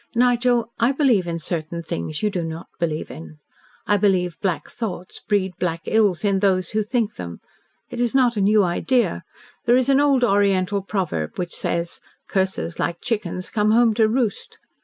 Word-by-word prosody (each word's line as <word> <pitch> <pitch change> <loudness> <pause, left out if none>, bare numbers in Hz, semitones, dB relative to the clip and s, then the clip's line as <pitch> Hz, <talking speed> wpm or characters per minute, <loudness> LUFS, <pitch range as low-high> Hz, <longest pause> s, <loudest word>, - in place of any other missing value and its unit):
"Nigel, 240 -1 +2
I 235 +4 +3
believe 250 - +2
in 170 0 -2
certain 170 0 -4
things 155 - -4
you 210 - +2
do 180 -4 -2
not 165 0 -6
believe 160 -2 -2
in. 155 -1 -10 0.5
I 205 - +3
believe 185 -4 +1
black 170 -7 -1
thoughts 205 -6 -6
breed 190 -3 +1
black 165 -2 -1
ills 205 -6 +2
to 200 -2 +1
those 185 -3 +1
who 215 - +1
think 220 0 -1
them. 85 -1 -7 0.5
It - - -5
is 240 +1 0
not 250 -3 +4
a 205 - 0
new 210 +1 +4
idea. 235 +8 +1 0.4
There 240 0 +5
is 255 +1 +1
an 275 0 +5
old 280 -3 +3
Oriental 200 -2 +2
proverb 180 - -3
which 175 -1 -3
says, 170 0 -3 0.3
'Curses, 190 -3 -1
like 170 - -1
chickens, 185 -5 -3
come 210 -1 +1
home 230 0 +4
to 220 0 +3
roost.' 225 -2 -2
200 Hz, 180 wpm, -22 LUFS, 175-230 Hz, 0.5 s, There